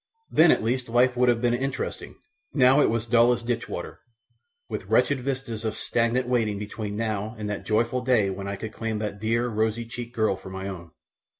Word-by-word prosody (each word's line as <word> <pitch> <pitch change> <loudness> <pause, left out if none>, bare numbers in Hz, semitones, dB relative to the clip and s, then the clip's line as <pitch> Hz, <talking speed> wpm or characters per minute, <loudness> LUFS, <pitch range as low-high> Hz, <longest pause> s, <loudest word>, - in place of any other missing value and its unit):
Then 160 +2 +6
at - - +4
least 125 +2 -1
life 125 +2 +3
would 125 0 +3
have 120 0 +1
been 120 -1 +3
interesting; 135 +2 -3 0.4
now 135 +1 +6
it - - +4
was 115 0 -1
dull 120 +1 +5
as 120 - -4
ditch 120 0 -2
water, - - -6 0.7
with - - -5
wretched 140 -2 +3
vistas 125 -4 -4
of 110 -1 -2
stagnant 120 +2 0
waiting 115 -5 +1
between 105 0 -5
now 110 0 -2
and 105 -1 -4
that 105 - -5
joyful 115 +3 +1
day 120 -6 +2
when 100 +1 -5
I 100 - -3
could 110 +2 -7
claim 115 -1 -3
that 105 -1 -4
dear, 115 +3 +1
rosy 110 0 -1
checked 120 +1 -7
girl 110 -3 +2
for - - -11
my 95 +1 -5
own. 85 -4 -7
115 Hz, 205 wpm, -26 LUFS, 105-125 Hz, 0.7 s, Then